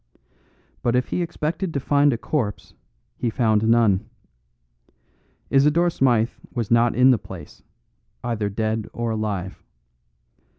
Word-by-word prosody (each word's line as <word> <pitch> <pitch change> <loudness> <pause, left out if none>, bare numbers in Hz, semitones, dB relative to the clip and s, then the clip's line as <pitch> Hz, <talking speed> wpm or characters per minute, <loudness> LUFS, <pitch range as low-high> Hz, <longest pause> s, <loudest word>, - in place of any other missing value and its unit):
But 120 0 +1
if 125 0 0
he - - -1
expected 165 +1 -3
to - - +1
find 145 +1 +3
a 120 - -1
corpse 115 -5 -3 0.4
he 120 - -1
found 110 -2 +1
none. 110 -3 +3 1.4
Isidore 150 +5 +4
Smythe 120 -6 +2 0.2
was 115 -3 -3
not 115 0 +4
in 130 +2 +6
the 120 - +2
place, 85 -6 -11 0.6
either 115 -4 -1
dead 110 +1 -2
or 120 -1 -2
alive. 100 -4 -3
115 Hz, 125 wpm, -23 LUFS, 110-135 Hz, 1.4 s, in